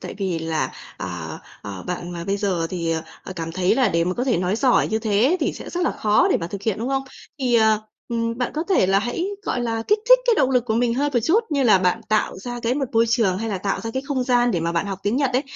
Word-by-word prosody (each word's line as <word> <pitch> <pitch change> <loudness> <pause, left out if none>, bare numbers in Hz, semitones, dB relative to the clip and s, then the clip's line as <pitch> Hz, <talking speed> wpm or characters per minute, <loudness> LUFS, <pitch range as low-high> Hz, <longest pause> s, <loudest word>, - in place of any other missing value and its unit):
tại - - -7
vì 185 -4 -1
là, 160 -1 -2 0.2
à, - - -6 0.2
ờ, 100 -2 -7
bạn 175 -1 -4
mà 170 -1 -5
bây 195 +1 0
giờ 190 -5 -1
thì, 170 -3 -1 0.3
ờ, - - -6
cảm 165 -1 -4
thấy 180 +1 +2
là 260 -4 +3
để 170 -2 +1
mà 180 +1 -1
có 245 - -1
thể 255 - +2
nói 180 +4 0
giỏi 255 0 +3
như 220 - 0
thế 220 - +2
thì - - 0
sẽ - - -9
rất 355 - -3
là - - +2
khó 210 0 +2
để - - +4
mà 165 - -3
thực 200 +3 -7
hiện, 215 -2 -1
đúng 235 +3 -3
không? 270 0 0 0.4
Thì, 255 -3 +1
ờ, 220 -2 +4 0.3
ừm, 230 0 -2
bạn 250 - -1
có 315 +2 -1
thể 370 - +4
là 195 +1 +3
hãy, 240 - -2 0.2
gọi 255 - -2
là, 225 -2 -1
kích 420 - +4
thích - - +9
cái 475 - +5
động 265 - +3
lực 250 -2 +2
của 220 -2 -1
mình 235 0 +1
hơn 290 +3 0
một 240 - +5
chút, 430 +8 +3
như 280 -3 +1
là 215 -6 +5
bạn 185 +4 +1
tạo 215 -3 0
ra 245 +4 -6
cái 235 +1 0
một 280 - 0
môi 230 0 +4
trường 220 -6 +2
hay 225 +2 -3
là 200 -3 -2
tạo 195 +1 -2
ra 225 - -4
cái 265 +3 -3
không 265 -4 -1
gian 245 -1 +3
để 175 - 0
mà 165 +1 -1
bạn 170 +4 0
học 195 -2 -4
tiếng 205 +4 0
Nhật 275 -2 +1
ấy, 255 +2 +2
225 Hz, 295 wpm, -22 LUFS, 185-250 Hz, 0.4 s, thích